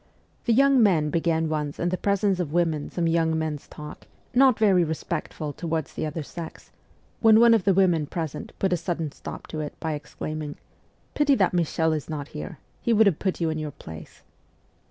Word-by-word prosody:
The 235 - +3
young 275 +1 +5
men 165 -8 +3
began 165 0 +1
once 150 -2 -2
in 175 - +1
the 185 - 0
presence 200 0 +1
of 165 -5 -2
women 160 -3 0
some 175 - -2
young 165 -1 +2
men's 155 -2 -3
talk, 150 0 -10 0.3
not 255 -1 +5
very 195 -5 +4
respectful 155 -1 -4
towards 160 -2 -3
the - - -2
other 155 +1 -4
sex, 165 +3 -9 0.5
when 220 -1 +6
one 235 0 +7
of 220 -5 +2
the 195 - +5
women 175 -6 +3
present 160 -2 -5
put 190 -2 +1
a - - +2
sudden 165 -2 -3
stop - - -8
to 155 - -5
it 150 -1 -6
by 160 -1 -2
exclaiming: 150 0 -5 0.3
' - - -39
Pity 290 -2 +3
that 190 -6 +2
Michel 165 -2 +1
is 155 -2 -4
not 150 -2 -5
here: 155 +1 -7 0.2
he 235 - +2
would 220 0 +5
have 190 -6 +2
put 190 -2 -1
you 165 -2 +1
in 155 - -3
your 155 -1 -3
place 80 - -11
165 Hz, 200 wpm, -25 LUFS, 155-190 Hz, 0.5 s, one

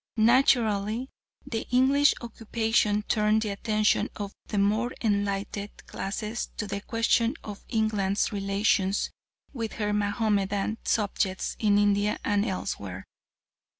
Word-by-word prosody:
Naturally 225 -1 +3 0.3
the 230 -5 -4
English 270 +3 +4
occupation 225 -2 0
turned 215 +1 +2
the 215 - -2
attention 215 +1 +1
of 200 -1 -5 0.2
the 210 - -3
more 215 +5 +2
enlightened 200 -1 -1 0.2
classes 215 +4 -4
to 210 - -2
the 200 0 -4
question 230 +1 +1
of 205 -2 -8
England's 210 -3 +1
relations 195 -1 +1 0.4
with 230 -4 -4
her 210 -2 -1
Mahomedan 205 0 0
subjects 195 -3 0
in 205 -2 +3
India 205 0 +2
and 205 0 +2
elsewhere. 100 - -4
210 Hz, 115 wpm, -27 LUFS, 200-225 Hz, 0.4 s, English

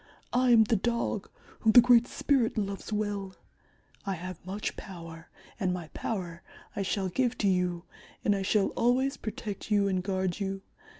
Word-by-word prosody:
I 250 +1 +3
am 230 -2 +7
the 220 +1 +1
Dog, 235 -1 -1 0.3
whom 220 -1 +3
the - - +11
Great 240 -1 +5
Spirit 260 -7 +1
loves 200 0 -3
well. 205 -3 -2 0.7
I 195 -1 -2
have 180 0 -7
much 195 +4 -4
power, 165 -3 -10 0.3
and 190 -4 +1
my 175 -3 -4
power 175 -5 -4 0.3
I - - -1
shall 195 0 -1
give 245 +6 0
to 205 - +1
you, 180 -2 0 0.4
and 205 - +4
I 195 - -2
shall 195 +1 +2
always 260 +3 +1
protect 215 -2 -6
you 205 -2 +3
and 185 -2 0
guard 190 -1 -1
you. 195 -1 -3
200 Hz, 170 wpm, -29 LUFS, 185-225 Hz, 0.7 s, the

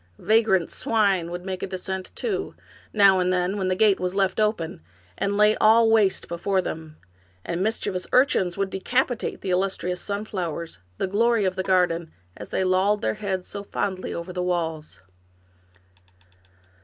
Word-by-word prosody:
Vagrant 215 -6 +2
swine 200 -6 +1
would 175 +1 -6
make 190 -1 -4
a - - -2
descent, 190 0 -5
too, 400 -4 -3 0.4
now 195 -3 +5
and 180 0 +1
then, 180 +1 0
when 190 -2 -1
the 185 - +1
gate 205 0 +3
was 180 +1 -2
left 195 0 +1
open, 210 - -1 0.3
and 200 +1 -1
lay 210 +1 +5
all 225 +1 +5
waste 210 -4 +2
before 190 +3 -1
them; 160 -3 -5 0.5
and 170 +1 -2
mischievous 190 -3 -1
urchins 225 -9 +3
would 195 -1 -1
decapitate 245 +6 -1
the 190 - -3
illustrious 180 -1 -1
sun 205 +1 -3
flowers, 170 - -5 0.2
the - - 0
glory 220 +2 +2
of 185 0 0
the 190 - -1
garden, 175 -3 +1 0.2
as 105 - -9
they - - 0
lolled 190 +3 +2
their - - +1
heads 195 -3 -3
so 200 - -6
fondly 195 -2 -3
over 170 +2 -5
the 180 - -2
walls. 160 - -3
190 Hz, 165 wpm, -24 LUFS, 180-210 Hz, 0.5 s, now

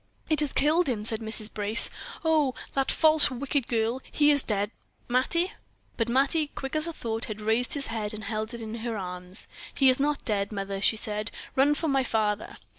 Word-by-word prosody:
"It 310 - +3
has 295 -2 +2
killed 310 +3 +2
him," 215 -4 -2
said 220 -1 0
Mrs. 220 -1 0
Brace. 210 +2 +3 0.3
"Oh! 305 -5 +2 0.2
that 270 -1 0
false, 310 -1 +5
wicked 270 0 -2
girl! 230 +2 0
He 295 0 +4
is 285 -1 +7
dead, 205 -2 -2 0.4
Mattie?" 300 +9 +1 0.4
But 230 -1 -1
Mattie, 280 +5 +2
quick 270 +2 -5
as 310 +2 +1
thought, 230 -8 -3
had 215 -1 -6
raised 225 +5 +1
his 280 -1 -2
head 210 -2 -2
and 215 0 -7
held 220 +2 -3
it 235 - -7
in 220 0 -6
her 225 -1 -3
arms. 180 0 -5 0.3
"He 270 -2 +5
is 255 - -1
not 290 +1 0
dead, 200 -2 0
mother," 195 -1 -4
she 220 - +3
said. 210 0 -1 0.3
"Run 280 +3 +4
for 320 - -2
my 270 -2 +2
father." 215 -3 -1
235 Hz, 195 wpm, -27 LUFS, 215-280 Hz, 0.4 s, is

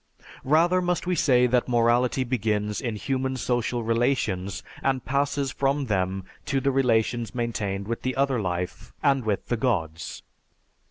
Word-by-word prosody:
"Rather 170 +6 +3
must 180 0 -1
we 180 - 0
say 125 -7 +4
that 125 0 +2
morality 120 +2 +2
begins 105 -4 -1
in 115 -3 -2
human 130 +3 -2
social 120 -1 -1
relations 115 -5 0 0.2
and 130 -2 0
passes 140 0 0
from 140 +1 0
them 95 -3 -1 0.2
to 140 -2 0
the 135 +1 +1
relations 120 -2 +1
maintained 105 -5 -2
with 115 0 -3
the 130 -1 -2
other 135 -3 +1
life 90 -1 -4
and 135 -2 +3
with 105 -3 -1
the 120 - -1
Gods. 85 -10 -2
125 Hz, 150 wpm, -26 LUFS, 110-135 Hz, 0.2 s, say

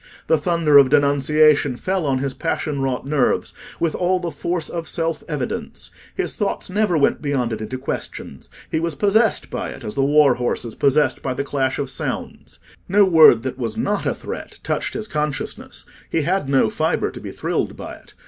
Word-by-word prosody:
The 160 - +2
thunder 160 -3 +4
of 135 -2 +5
denunciation 145 -1 +3
fell 185 -1 -1
on 135 -1 +1
his 135 0 -2
passion 150 -3 -2
wrought 130 -1 -2
nerves 140 -2 0 0.3
with 165 -2 0
all 185 +1 +1
the 175 -2 -4
force 165 +2 -3
of 165 -2 -5
self 165 -1 -2
evidence: 145 -5 -4 0.2
his - - -2
thought - - -2
never 205 -4 +1
went 140 - +2
beyond 135 -5 -1
it 110 - -5
into 130 +4 -4
questions—he 130 - -6
was 165 -2 -2
possessed 210 +7 +2
by - - -3
it - - -9
as 105 -2 -5
the 135 - +1
war 145 -1 +5
horse 120 0 -2
is 115 - -6
possessed 140 -1 +2
by 130 -1 -3
the 140 - -2
clash 135 -2 -1
of 140 - -2
sounds. - - -5 0.3
No 200 +2 +5
word 160 -10 +7
that 130 0 -4
was 115 -3 -3
not 205 0 -1
a - - 0
threat - - -8
touched - - -2
his 215 - -2
consciousness; 150 -4 -4 0.2
he 160 - 0
had 180 -3 0
no 135 -1 +3
fibre - - 0
to - - -10
be - - -7
thrilled - - -2
by - - -7
it. - - -21
145 Hz, 195 wpm, -21 LUFS, 135-165 Hz, 0.3 s, word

